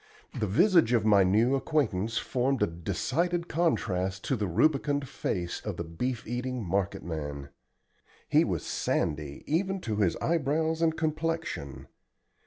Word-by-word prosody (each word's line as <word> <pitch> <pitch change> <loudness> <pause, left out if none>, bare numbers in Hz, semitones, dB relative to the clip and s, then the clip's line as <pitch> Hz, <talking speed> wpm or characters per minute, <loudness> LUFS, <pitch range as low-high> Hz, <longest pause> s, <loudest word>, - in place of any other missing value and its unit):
The 105 - -2
visage 170 - +4
of 115 -3 +2
my 100 -3 +6
new 110 +8 +3
acquaintance 125 - 0
formed 130 +2 0
a - - +6
decided 135 - -1
contrast 95 - 0
to 135 - 0
the 105 -4 -1
rubicund 140 - +1
face 85 -7 -3
of 105 -5 -4
the 85 - -2
beef 110 +9 -3
eating 125 +1 -3
marketman. 80 -7 -3 0.8
He - - +4
was - - -2
sandy 75 -1 -2
even 190 +5 0
to 110 -7 -3
his 100 -5 +2
eyebrows 160 0 0
and 160 -1 +2
complexion. 160 - -2
120 Hz, 135 wpm, -29 LUFS, -, 0.8 s, my